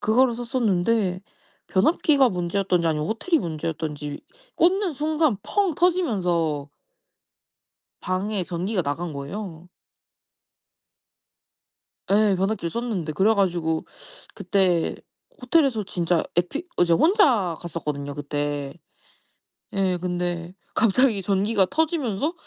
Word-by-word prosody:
그거를 240 +3 +3
썼었는데 225 -5 0 0.5
변압기가 275 - +3
문제였던지 180 -1 0
아니면 155 -1 -1
호텔이 270 - +1
문제였던지 155 - -4 0.4
꽂는 365 +1 +3
순간 305 -4 +1
펑 400 -4 +1
터지면서 180 - +1 1.3
방에 190 +1 -1
전기가 180 +3 -2
나간 155 +3 -3
거예요. 165 +4 -7 2.4
예. 205 -1 +4
변압기를 195 -1 -1
썼는데. 205 -8 -3
그래 200 +8 +3
가지고 170 -5 0 0.5
그때 185 -3 +1 0.5
호텔에서 255 -4 +2
진짜 175 -3 0
에피 180 - -1
어 - - +5
이제 170 -1 +3
혼자 245 - +3
갔었거든요 150 -4 -4
그때. 145 -1 -3 1.0
예 190 -2 +1
근데 175 -1 -3 0.2
갑자기 230 0 +3
전기가 200 +1 +2
터지면서 300 - 0
190 Hz, 250 characters per minute, -24 LUFS, 170-235 Hz, 2.4 s, 어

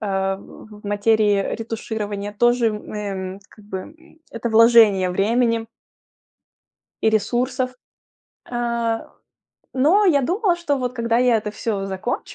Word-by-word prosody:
а, 195 -2 -1
в 210 +1 -14
в - - -28
материи 205 -1 +2
ретуширования. 215 -2 -5
Тоже, 240 0 +3
эм, 200 -3 -5
как 210 - -18
бы, 195 -2 -5
м, 320 - -14
это 230 0 -4
вложение 220 -4 +6
времени 230 +4 +1 1.4
и 220 - +4
ресурсов. 255 +4 0 0.8
Э, 235 -1 -1 0.7
но 320 +11 +3
я 285 -6 +4
думала, 360 - +1
что 325 -5 -1
вот 250 -2 -3
когда 230 -1 +1
я 245 -2 +4
это 210 -1 -3
всё 210 -2 -3
закончу, 190 +5 -4
225 Hz, 125 wpm, -21 LUFS, 205-245 Hz, 1.4 s, вложение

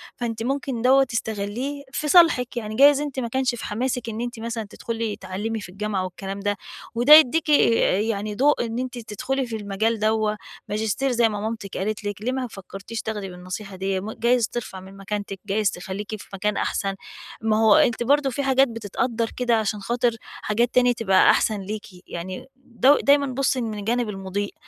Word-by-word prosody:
فأنتِ 230 -3 -4
ممكن 270 -2 -2
دوّة 265 +2 +5
تستغليه 230 +4 -3
في 300 - -3
صالحِك. 300 -8 +5
يعني 215 -2 -4
جايز 285 +3 +6
أنتِ 285 -3 -4
ما 240 - -2
كانش 260 +1 0
في - - -7
حماسِك 240 +1 -2
إن 225 +1 -4
أنتِ 240 -1 -5
مثلًا 225 -2 -4
تدخُلي 225 -1 -4
تعلِّمي 205 +4 -4
في 180 - -9
الجامعة 200 0 -2
والكلام 195 +2 -6
ده، 205 0 -1 0.4
وده 245 +6 +7
يدّيكِ 315 +2 +5
يعني 215 -6 +2
ضوء 280 0 +3
إن 230 +1 -4
أنتِ 255 -1 -4
تدخُلي 250 +4 -3
في 230 - -5
المجال 215 +2 -1
دوّة، 215 0 +1 0.3
ماجستير 220 +5 0
زي 235 -2 +3
ما 210 - -4
مامتك 220 -3 -5
قالت 210 +2 -2
لِك. 205 -1 -4
ليه 245 +4 -1
ما 260 -1 -2
فكرتيش 200 +2 -8
تاخدي 210 -3 -4
بالنصيحة 185 +3 -7
ديّة؟ 190 0 -1
م 205 +3 -6
جايز 235 0 +2
ترفع 220 -5 -5
من 190 +1 -13
مكانتك، 200 0 -5
جايز 205 0 +1
تخليكِ 190 +3 -6
في - - -14
مكان 210 +2 -1
أحسن. 195 -1 -1 0.5
ما 220 -1 +2
هُو 220 -2 +6
أنتِ 240 0 +3
برضه 280 +2 +3
في 280 +3 -3
حاجات 270 0 +4
بتتقدر 230 +1 -2
كده 245 -2 +2
عشان 215 -1 -1
خاطر 240 +3 0
حاجات 230 +3 -1
تاني 245 -1 +5
تبقى 195 -5 +4
أحسن 215 -2 +2
ليكِ. 210 +2 -5 0.2
يعني 185 +6 -6
دو 260 +2 +3
دايمًا 280 0 +5
بُصي 260 0 0
من 220 -3 -4
الجانب 235 +2 -1
المضيء، 195 0 -4
225 Hz, 185 wpm, -23 LUFS, 205-250 Hz, 0.5 s, وده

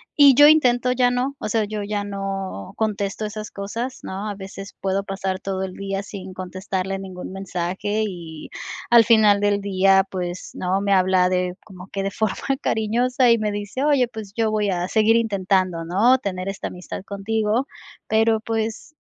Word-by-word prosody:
y 285 -3 +7
yo 290 +3 +9
intento 250 -5 +4
ya 250 0 +3
no, 250 +3 -1
o - - -4
sea, 225 0 +2
yo 210 0 -4
ya 205 0 -2
no 195 - -5
contesto 210 -1 -2
esas 215 0 -6
cosas, 230 +6 -5
¿no?, 195 +3 -5
a 205 - -4
veces 195 0 -9
puedo 195 +1 0
pasar 195 -1 -3
todo 190 -1 -3
el 190 -1 -5
día 195 +1 -4
sin 190 -2 -8
contestarle 190 +1 -4
ningún 185 -1 -7
mensaje, 195 +3 -2
y 170 -5 -8 0.4
al 235 -1 +8
final 215 -3 +5
del 205 0 +1
día, 195 -1 +4
pues, 180 -1 -4
¿no?, 185 +1 -1
me 200 -1 +2
habla 185 -1 +4
de 180 0 0
como 190 -3 -12
que 195 -1 -4
de 195 - -2
forma 220 0 -1 0.3
cariñosa 240 +3 +2
y 230 - +4
me 210 -1 -1
dice: 205 +6 -4
"Oye, 285 -4 +3
pues, 220 -4 -9
yo 225 -1 +1
voy 210 -1 +1
a 180 -1 -1
seguir 220 0 +4
intentando", 190 -6 +1
¿no?, 220 +10 +4
tener 190 -4 -3
esta 195 - -4
amistad 180 +1 -7
contigo, 215 +4 -1 0.4
pero, 220 0 +3
pues, 225 +6 -3
200 Hz, 180 wpm, -22 LUFS, 190-220 Hz, 0.4 s, yo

